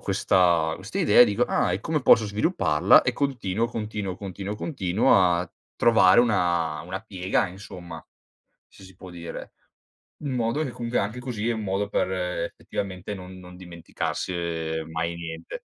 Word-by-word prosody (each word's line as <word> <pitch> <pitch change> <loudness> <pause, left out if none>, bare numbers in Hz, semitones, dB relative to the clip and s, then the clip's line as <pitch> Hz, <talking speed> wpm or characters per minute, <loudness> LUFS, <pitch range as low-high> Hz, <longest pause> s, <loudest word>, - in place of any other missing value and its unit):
questa 85 -3 +2
questa 95 +3 -6
idea 105 - +5
e - - +11
dico: 105 +1 0
"Ah, 90 - +1
e 95 - -2
come 155 +5 -1
posso 115 -4 +5
svilupparla?" 100 - +3
E 125 - 0
continuo, 115 -6 -1
continuo, 105 -4 -4
continuo, 100 +1 -6
continuo 105 - +1
a 90 -1 +1 0.2
trovare 110 -3 +5
una 85 -8 +1
una 95 +3 -6
piega, 95 -3 -1
insomma, 90 -3 -10 0.6
se - - -18
si 95 -1 -15
può 95 0 -12
dire. 85 -1 -8 0.7
In 145 -3 -4
modo 120 +5 0
che 135 - -4
comunque 120 0 -3
anche 105 +5 -2
così 120 -3 -3
è - - +2
un 110 - -4
modo 100 0 -1
per 95 - 0
effettivamente 90 +2 -4
non 95 -1 -10
non 90 0 -12
dimenticarsi 90 +1 -5 0.6
mai 85 +1 -2
niente. 85 -1 -7
95 Hz, 155 wpm, -25 LUFS, 90-110 Hz, 0.7 s, e